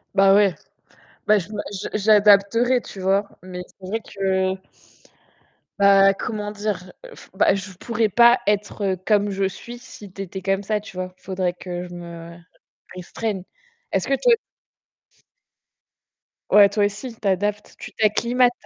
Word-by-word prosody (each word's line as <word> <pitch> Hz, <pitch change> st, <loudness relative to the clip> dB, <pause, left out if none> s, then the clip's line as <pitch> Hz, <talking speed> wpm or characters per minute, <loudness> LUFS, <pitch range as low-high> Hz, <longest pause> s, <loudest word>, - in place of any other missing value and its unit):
Bah 195 Hz, 0 st, +6 dB
ouais. 200 Hz, -3 st, +4 dB, 0.7 s
bah, 210 Hz, -1 st, +4 dB
je 180 Hz, +3 st, -8 dB
ma 210 Hz, -1 st, -3 dB
je 195 Hz, -, -5 dB
j'adapterai, 210 Hz, +4 st, +4 dB
tu 195 Hz, -, -11 dB
vois? 195 Hz, +2 st, +1 dB
Mais 180 Hz, -1 st, -8 dB
c'est 185 Hz, -, -14 dB
vrai 225 Hz, +4 st, -2 dB
que 190 Hz, -2 st, -1 dB, 1.2 s
Bah, 195 Hz, 0 st, +6 dB
comment 210 Hz, -1 st, -4 dB
dire? 210 Hz, -1 st, -2 dB, 0.3 s
Je -, -, -11 dB
ef -, -, -16 dB
bah -, -, +3 dB
je 195 Hz, 0 st, -6 dB
pourrais 230 Hz, +4 st, -1 dB
pas 235 Hz, +4 st, +5 dB
être 205 Hz, -1 st, 0 dB
comme 205 Hz, -1 st, +2 dB
je 195 Hz, 0 st, 0 dB
suis 235 Hz, +5 st, -9 dB
si 210 Hz, -6 st, -13 dB
tu 195 Hz, -, -7 dB
étais 190 Hz, 0 st, -7 dB
comme 195 Hz, +1 st, 0 dB
ça, 210 Hz, +1 st, -1 dB
tu 205 Hz, -, -13 dB
vois? 185 Hz, 0 st, -5 dB
Il -, -, -33 dB
faudrait 185 Hz, -2 st, -2 dB
que 180 Hz, 0 st, -6 dB
je 175 Hz, -, -12 dB
me 170 Hz, -1 st, -10 dB, 0.6 s
restreigne. 190 Hz, +2 st, -4 dB, 0.5 s
Est-ce -, -, 0 dB
que -, -, +2 dB
toi -, -, +5 dB, 2.2 s
Ouais, 205 Hz, -1 st, +7 dB
toi 205 Hz, 0 st, +1 dB
aussi, 225 Hz, +4 st, -5 dB
tu 215 Hz, -2 st, -5 dB
adaptes, 205 Hz, +2 st, -1 dB
tu -, -, -9 dB
t'acclimates. 235 Hz, +3 st, +2 dB
200 Hz, 160 wpm, -22 LUFS, 190-215 Hz, 2.2 s, Ouais